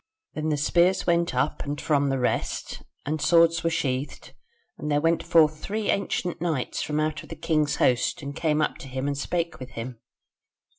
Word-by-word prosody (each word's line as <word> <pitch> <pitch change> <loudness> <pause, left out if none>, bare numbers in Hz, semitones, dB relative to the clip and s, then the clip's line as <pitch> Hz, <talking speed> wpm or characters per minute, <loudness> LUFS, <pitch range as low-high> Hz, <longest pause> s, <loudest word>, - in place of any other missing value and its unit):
"Then 155 0 -2
the 150 - +1
spears 175 +5 +3
went 170 -4 +1
up 130 +4 0
and 145 +1 -4
from 145 -2 +1
the 135 - 0
rest, 125 - -2 0.2
and 155 +1 -2
swords 170 -1 +4
were 165 - +2
sheathed, 135 -3 -3 0.5
and 150 - -4
there 145 - +3
went 165 +2 +2
forth 155 -2 +4
three 215 +4 -1
ancient 180 -3 -2
knights 160 -7 -1
from 150 0 -1
out 155 0 -1
of - - -14
the 165 - -6
king's 155 -1 +1
host 125 +3 +1
and 140 0 -6
came 155 -2 +1
up - - -2
to - - -9
him 130 +1 -4
and 145 0 0
spake 170 +4 -2
with 130 0 -9
him. 115 0 -6
155 Hz, 195 wpm, -26 LUFS, 140-165 Hz, 0.5 s, swords